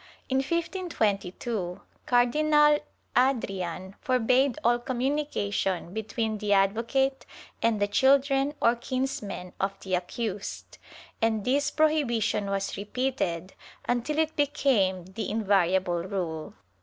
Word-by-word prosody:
In 265 Hz, -, +1 dB
1522 230 Hz, -, -1 dB, 0.3 s
Cardinal 295 Hz, +4 st, +4 dB, 0.4 s
Adrian 195 Hz, -8 st, 0 dB
forbade 255 Hz, +1 st, +2 dB
all 240 Hz, +1 st, +3 dB
communication 240 Hz, -, -1 dB
between 220 Hz, 0 st, -2 dB
the 205 Hz, -1 st, +1 dB
advocate 230 Hz, +7 st, +1 dB, 0.4 s
and 230 Hz, -2 st, +2 dB
the 205 Hz, -, +2 dB
children 275 Hz, +5 st, +3 dB
or 230 Hz, +1 st, +4 dB
kinsmen 235 Hz, -7 st, -4 dB
of 195 Hz, 0 st, -2 dB
the 190 Hz, -, -5 dB
accused, 200 Hz, +3 st, -4 dB, 0.4 s
and 220 Hz, -2 st, +1 dB
this 285 Hz, +3 st, +2 dB
prohibition 265 Hz, -10 st, +1 dB
was 195 Hz, 0 st, -2 dB
repeated 200 Hz, -5 st, -2 dB, 0.3 s
until 245 Hz, +5 st, 0 dB
it 315 Hz, 0 st, +1 dB
became 240 Hz, -, +1 dB
the 190 Hz, +4 st, -5 dB
invariable 190 Hz, -4 st, +2 dB
rule. 170 Hz, -4 st, -4 dB
225 Hz, 105 wpm, -27 LUFS, 195-270 Hz, 0.4 s, Cardinal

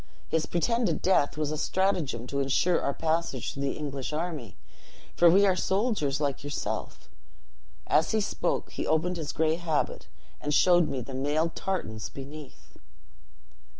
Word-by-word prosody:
His 160 Hz, -1 st, 0 dB
pretended 225 Hz, +1 st, +1 dB
death 165 Hz, -6 st, +3 dB
was 155 Hz, -1 st, -1 dB
a 155 Hz, -, -3 dB
stratagem 175 Hz, -, 0 dB
to 140 Hz, +2 st, -3 dB
insure 140 Hz, +6 st, +2 dB
our 140 Hz, -, 0 dB
passage 160 Hz, -4 st, -1 dB
through 140 Hz, -, -6 dB
the 140 Hz, -1 st, -1 dB
English 140 Hz, -3 st, -4 dB
army; 155 Hz, -, -4 dB, 0.6 s
for 175 Hz, -, +6 dB
we 195 Hz, +4 st, +6 dB
are 190 Hz, -2 st, +4 dB
soldiers 190 Hz, -, 0 dB
like 140 Hz, -3 st, -1 dB
yourself.' 145 Hz, 0 st, -4 dB, 0.8 s
As 160 Hz, -, +3 dB
he 220 Hz, -, +2 dB
spoke, 210 Hz, -, -1 dB
he -, -, -4 dB
opened 170 Hz, +3 st, +1 dB
his 155 Hz, -3 st, -3 dB
gray 160 Hz, 0 st, +1 dB
habit, 165 Hz, -3 st, -1 dB, 0.3 s
and 150 Hz, 0 st, 0 dB
showed 175 Hz, -3 st, +5 dB
me 130 Hz, -, -3 dB
the 130 Hz, +3 st, -8 dB
mailed 150 Hz, +5 st, 0 dB
tartans 110 Hz, -, -3 dB
beneath." 140 Hz, +1 st, -11 dB
155 Hz, 150 wpm, -28 LUFS, 140-175 Hz, 0.8 s, for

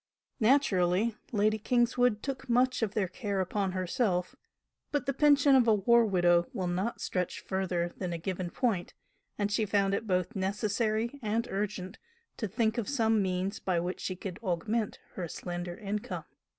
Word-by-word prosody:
Naturally, 215 Hz, -4 st, +3 dB, 0.2 s
Lady 215 Hz, -1 st, +2 dB
Kingswood 240 Hz, -1 st, +2 dB
took 270 Hz, -1 st, -5 dB
much 255 Hz, +1 st, +3 dB
of 215 Hz, -3 st, -1 dB
their 205 Hz, -4 st, +1 dB
care 200 Hz, 0 st, -3 dB
upon 190 Hz, 0 st, -1 dB
herself 185 Hz, 0 st, 0 dB, 0.6 s
but 290 Hz, -1 st, 0 dB
the 275 Hz, -, 0 dB
pension 285 Hz, 0 st, +5 dB
of 255 Hz, -3 st, +5 dB
a 220 Hz, -, +6 dB
war 230 Hz, +3 st, +4 dB
widow 175 Hz, -3 st, +3 dB
will 185 Hz, -, -2 dB
not 185 Hz, +6 st, -1 dB
stretch 180 Hz, -2 st, -2 dB
further 180 Hz, -3 st, -2 dB
than 180 Hz, -2 st, -3 dB
a 170 Hz, -, -2 dB
given 180 Hz, +1 st, -3 dB
point, 195 Hz, -3 st, -1 dB, 0.4 s
and 205 Hz, 0 st, 0 dB
she 220 Hz, +2 st, +2 dB
found 200 Hz, -1 st, +1 dB
it 220 Hz, +2 st, -2 dB
both 185 Hz, +4 st, 0 dB
necessary 215 Hz, +5 st, -1 dB
and 225 Hz, +1 st, -1 dB
urgent 195 Hz, -1 st, -3 dB, 0.4 s
to 220 Hz, -, -2 dB
think 220 Hz, +3 st, 0 dB
of 225 Hz, -, -3 dB
some 225 Hz, -6 st, +2 dB
means 190 Hz, +2 st, -1 dB
by 180 Hz, -2 st, 0 dB
which 175 Hz, +2 st, -3 dB
she 185 Hz, -, -3 dB
could 180 Hz, -1 st, -7 dB
augment 210 Hz, +3 st, -1 dB, 0.2 s
her 180 Hz, -2 st, -4 dB
slender 175 Hz, +1 st, -5 dB
income. 210 Hz, -1 st, -4 dB
205 Hz, 165 wpm, -30 LUFS, 185-230 Hz, 0.6 s, a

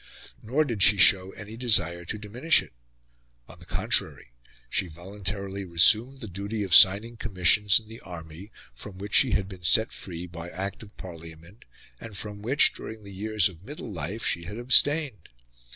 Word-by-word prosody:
Nor 135 Hz, +8 st, 0 dB
did 115 Hz, -7 st, -4 dB
she 100 Hz, +2 st, +6 dB
show 95 Hz, 0 st, +4 dB
any 110 Hz, +1 st, -10 dB
desire 95 Hz, -8 st, 0 dB
to 105 Hz, -, -5 dB
diminish 120 Hz, +10 st, +1 dB
it. -, -, -18 dB, 0.7 s
On -, -, -15 dB
the -, -, -17 dB
contrary, -, -, 0 dB, 0.4 s
she 90 Hz, -, -1 dB
voluntarily 95 Hz, +3 st, -6 dB
resumed 110 Hz, +9 st, +3 dB
the 110 Hz, -, -7 dB
duty 100 Hz, +3 st, -5 dB
of 95 Hz, -4 st, -3 dB
signing 105 Hz, +6 st, +6 dB
commissions 100 Hz, -1 st, +3 dB
in 110 Hz, -, -19 dB
the 115 Hz, +2 st, -12 dB
army, 85 Hz, +2 st, -11 dB, 0.2 s
from 95 Hz, -, -10 dB
which 100 Hz, +3 st, -9 dB
she 130 Hz, -5 st, +3 dB
had 95 Hz, -2 st, -1 dB
been 95 Hz, -2 st, -12 dB
set 110 Hz, +6 st, +3 dB
free 90 Hz, -2 st, -8 dB
by 85 Hz, 0 st, -9 dB
Act 95 Hz, +3 st, -6 dB
of 105 Hz, -2 st, -15 dB
Parliament, 85 Hz, +2 st, -12 dB, 0.3 s
and 110 Hz, -3 st, -10 dB
from 105 Hz, 0 st, -7 dB
which, 130 Hz, +7 st, +2 dB
during 110 Hz, -1 st, -10 dB
the 100 Hz, -1 st, -12 dB
years 105 Hz, 0 st, 0 dB
of 90 Hz, -2 st, -14 dB
middle 125 Hz, -3 st, -9 dB
life, 90 Hz, +7 st, -6 dB
she 85 Hz, -, -2 dB
had 105 Hz, +5 st, -8 dB
abstained. 130 Hz, -, +3 dB
100 Hz, 175 wpm, -25 LUFS, 90-110 Hz, 0.7 s, she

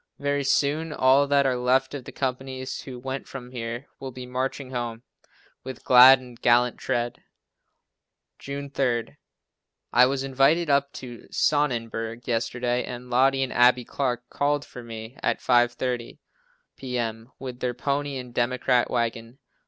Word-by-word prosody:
Very 145 Hz, 0 st, -1 dB
soon, 150 Hz, +4 st, +1 dB
all 135 Hz, 0 st, +4 dB
that 140 Hz, 0 st, +3 dB
are 130 Hz, -1 st, +2 dB
left 130 Hz, +2 st, +1 dB
of 135 Hz, -4 st, -6 dB
the -, -, -8 dB
companies, 130 Hz, 0 st, -4 dB
who 130 Hz, -2 st, -8 dB
went 135 Hz, +2 st, -5 dB
from 125 Hz, -2 st, -9 dB
here, 120 Hz, +1 st, -5 dB
will 135 Hz, -, -6 dB
be 125 Hz, 0 st, -8 dB
marching 130 Hz, +1 st, -3 dB
home, 120 Hz, -2 st, -4 dB, 0.6 s
"with 130 Hz, -1 st, -8 dB
glad 130 Hz, +1 st, +9 dB
and 125 Hz, -2 st, -14 dB
gallant 120 Hz, 0 st, +3 dB
tread." 120 Hz, 0 st, -2 dB, 1.2 s
June 140 Hz, 0 st, -6 dB
3. 125 Hz, -4 st, -1 dB, 0.8 s
I 125 Hz, +1 st, +7 dB
was 135 Hz, 0 st, -1 dB
invited 140 Hz, +5 st, +2 dB
up 140 Hz, 0 st, +2 dB
to 120 Hz, -3 st, -9 dB
Sonnenberg 115 Hz, -5 st, -1 dB
yesterday 120 Hz, +1 st, -1 dB
and 125 Hz, 0 st, -8 dB
Lottie 135 Hz, +2 st, +3 dB
and 130 Hz, -, -4 dB
Abbie 125 Hz, 0 st, +4 dB
Clark 125 Hz, -2 st, -2 dB
called 145 Hz, 0 st, 0 dB
for 125 Hz, -, -10 dB
me 115 Hz, +2 st, -9 dB
at -, -, +1 dB
5:30 120 Hz, 0 st, +1 dB, 0.6 s
p.m., 120 Hz, -2 st, -4 dB
with 125 Hz, -2 st, -7 dB
their 125 Hz, -1 st, -2 dB
pony 140 Hz, +1 st, -2 dB
and 125 Hz, -2 st, -8 dB
democrat 125 Hz, 0 st, +1 dB
wagon. 115 Hz, 0 st, -2 dB
125 Hz, 145 wpm, -25 LUFS, 120-135 Hz, 1.2 s, glad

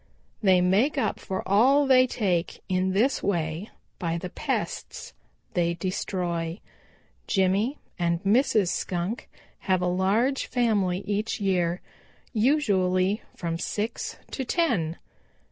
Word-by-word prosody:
They 190 Hz, -4 st, +5 dB
make 210 Hz, +12 st, +2 dB
up 270 Hz, -, 0 dB
for 190 Hz, -, -4 dB
all 260 Hz, +9 st, +5 dB
they 255 Hz, -1 st, +6 dB
take 185 Hz, -8 st, -1 dB
in 185 Hz, 0 st, +1 dB
this 235 Hz, +8 st, +2 dB
way 170 Hz, 0 st, -1 dB, 0.3 s
by 170 Hz, -1 st, -1 dB
the 180 Hz, +1 st, -6 dB
pests -, -, -4 dB, 0.4 s
they 170 Hz, -1 st, +1 dB
destroy. 175 Hz, -1 st, -2 dB, 0.7 s
Jimmy 200 Hz, +7 st, +1 dB, 0.2 s
and 170 Hz, -1 st, +1 dB
Mrs. 210 Hz, -2 st, +3 dB
Skunk 180 Hz, +8 st, -3 dB, 0.4 s
have 185 Hz, -1 st, +4 dB
a -, -, +2 dB
large 200 Hz, +9 st, +1 dB
family 205 Hz, -7 st, +1 dB
each 210 Hz, +3 st, -1 dB
year, 180 Hz, -3 st, 0 dB, 0.5 s
usually 205 Hz, -6 st, +2 dB
from 165 Hz, -1 st, -3 dB
six 215 Hz, +5 st, -3 dB
to 265 Hz, -, -3 dB
ten. 230 Hz, -, 0 dB
190 Hz, 115 wpm, -26 LUFS, 180-230 Hz, 0.7 s, they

